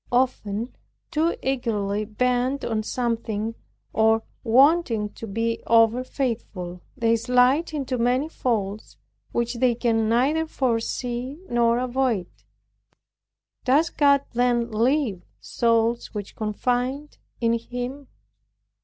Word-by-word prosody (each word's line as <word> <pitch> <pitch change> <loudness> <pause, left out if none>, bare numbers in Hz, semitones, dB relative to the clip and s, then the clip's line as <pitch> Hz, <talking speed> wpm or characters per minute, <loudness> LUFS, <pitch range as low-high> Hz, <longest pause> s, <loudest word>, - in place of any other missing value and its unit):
Often 240 -3 0 0.4
too 325 +2 +1
eagerly 215 -6 -1
bent 250 +5 0
on 220 -2 -1
something, 225 -2 -2 0.4
or 220 0 +3 0.2
wanting 245 -3 +4
to 225 - -9
be 230 +3 -1
over 230 +2 +4
faithful, 215 -10 -4 0.2
they 230 -2 +3
slide 250 +7 +3
into 270 -5 -2
many 250 +5 +2
faults, 215 -9 -3 0.3
which 235 0 -1
they 250 -2 +3
can 225 -2 +1
neither 285 +8 +2
foresee 250 +3 -2
nor 235 -1 +3
avoid. 250 -5 0 1.4
Does 290 +6 +3
God 280 -2 +4
then 240 -1 +1
leave 230 -4 +1 0.2
souls 230 0 0
which 205 -1 -6
confide 250 +6 -2 0.2
in 230 -1 +2
Him? 245 +4 -6
240 Hz, 105 wpm, -24 LUFS, 225-260 Hz, 1.4 s, wanting